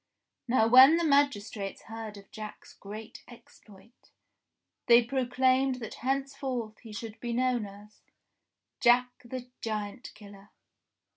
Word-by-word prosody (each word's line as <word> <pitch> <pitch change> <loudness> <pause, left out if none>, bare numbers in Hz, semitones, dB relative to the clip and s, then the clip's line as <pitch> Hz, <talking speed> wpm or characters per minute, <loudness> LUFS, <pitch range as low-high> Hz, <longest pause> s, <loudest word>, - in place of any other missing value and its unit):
Now 235 -2 +3
when 260 +7 +8
the 340 - 0
magistrates 250 -9 0
heard 225 -2 -8
of 200 - -15
Jack's 215 -1 -9
great 215 +5 -10
exploit, 225 -2 -18 0.8
they 235 0 +7
proclaimed 260 +1 +1
that 230 -4 -7
henceforth 265 -4 -3
he 225 - -12
should 220 +1 -8
be 240 -1 -4
known 245 -3 0
as 205 +2 -15 0.4
— - - -58
JACK 250 +1 +5
THE 250 +1 -7
GIANT 215 +4 -5
KILLER. 200 -1 -14
235 Hz, 125 wpm, -29 LUFS, 215-255 Hz, 0.8 s, when